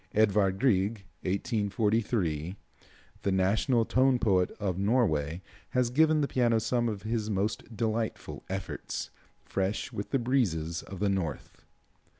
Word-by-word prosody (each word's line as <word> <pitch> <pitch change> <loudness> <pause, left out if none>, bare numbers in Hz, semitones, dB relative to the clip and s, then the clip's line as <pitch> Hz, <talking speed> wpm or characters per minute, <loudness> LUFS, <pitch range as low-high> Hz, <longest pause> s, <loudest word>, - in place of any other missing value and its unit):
Edward 100 -3 +3
Grieg 105 -4 +1 0.2
(1843 100 - 0 0.3
), - - -28
the 100 - 0
national 105 +6 +2
tone 130 +1 +3
poet 95 -6 +2
of 95 -3 -1
Norway, 95 - +1 0.3
has 125 -2 +2
given 155 +3 +4
the 140 - +1
piano 120 -4 +2
some 120 +1 0
of 100 -3 -5
his 110 -1 -1
most 105 +2 -2
delightful 110 -1 -2
efforts, - - -4 0.3
fresh 95 +2 -2
with 100 - -4
the 135 - +2
breezes 95 - 0
of 95 -1 -9
the 100 - +2
North. 95 -6 -3
105 Hz, 135 wpm, -29 LUFS, 95-120 Hz, 0.3 s, given